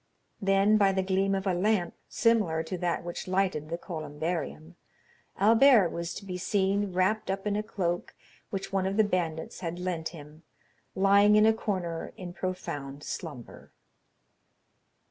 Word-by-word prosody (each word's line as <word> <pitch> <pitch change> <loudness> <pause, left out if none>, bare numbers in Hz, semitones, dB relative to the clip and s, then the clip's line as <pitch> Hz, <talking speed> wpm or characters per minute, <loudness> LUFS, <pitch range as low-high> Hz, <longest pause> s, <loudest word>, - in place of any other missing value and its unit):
Then, 195 +2 +4
by 195 -1 +4
the 190 0 0
gleam 195 +1 +1
of 190 0 -3
a 190 - +1
lamp, 180 -1 +1 0.2
similar 210 -9 +2
to 165 +3 -5
that 175 -1 -1
which 175 +1 -6
lighted 185 -5 0
the 170 - -2
columbarium, 160 0 -5 0.6
Albert 225 -1 +6
was 170 +1 -4
to 200 - -8
be 180 -2 -5
seen 200 +1 +1
wrapped 185 +4 +1
up 195 +1 -2
in 205 -1 0
a 210 - 0
cloak 180 -5 -3 0.3
which 195 0 -5
one 190 -1 +1
of 195 +2 -2
the 220 - +6
bandits 170 -5 -2
had 175 -1 -4
lent 180 -3 -3
him, 150 -1 -12 0.5
lying 200 +2 +5
in 210 0 +6
a 220 - +5
corner 185 -7 -3
in 180 -2 -7
profound 145 -7 -5
slumber. 145 -8 -8
185 Hz, 155 wpm, -28 LUFS, 170-200 Hz, 0.6 s, Albert